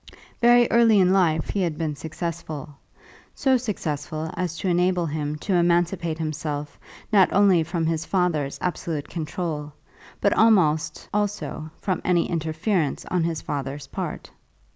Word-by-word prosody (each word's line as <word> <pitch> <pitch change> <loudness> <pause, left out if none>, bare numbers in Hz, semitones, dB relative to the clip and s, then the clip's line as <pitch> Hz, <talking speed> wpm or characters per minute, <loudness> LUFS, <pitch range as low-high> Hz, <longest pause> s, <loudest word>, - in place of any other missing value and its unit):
Very 240 0 +6
early 230 -3 +5
in 185 0 +4
life 165 -5 +2
he 200 - -1
had 165 -4 -1
been 160 -2 -2
successful, 160 -1 -6 0.6
so 265 -1 +3
successful 160 - -3
as 175 -3 -3
to 190 - -3
enable 180 0 +2
him 150 -1 -3
to 200 - 0
emancipate 170 -1 +1
himself 150 -2 -4 0.3
not 195 -3 +5
only 195 -3 +5
from 165 0 -2
his 160 0 0
father's 160 -6 0
absolute 165 -4 -2
control, 155 -2 -4 0.5
but 200 - +3
almost 180 -9 +3
also 205 -6 -2
from 185 -2 -1
any 175 -2 +2
interference 160 0 -1
on 175 -3 +1
his 165 -2 -3
father's 140 0 -4
part. - - -6
170 Hz, 140 wpm, -24 LUFS, 155-185 Hz, 0.6 s, Very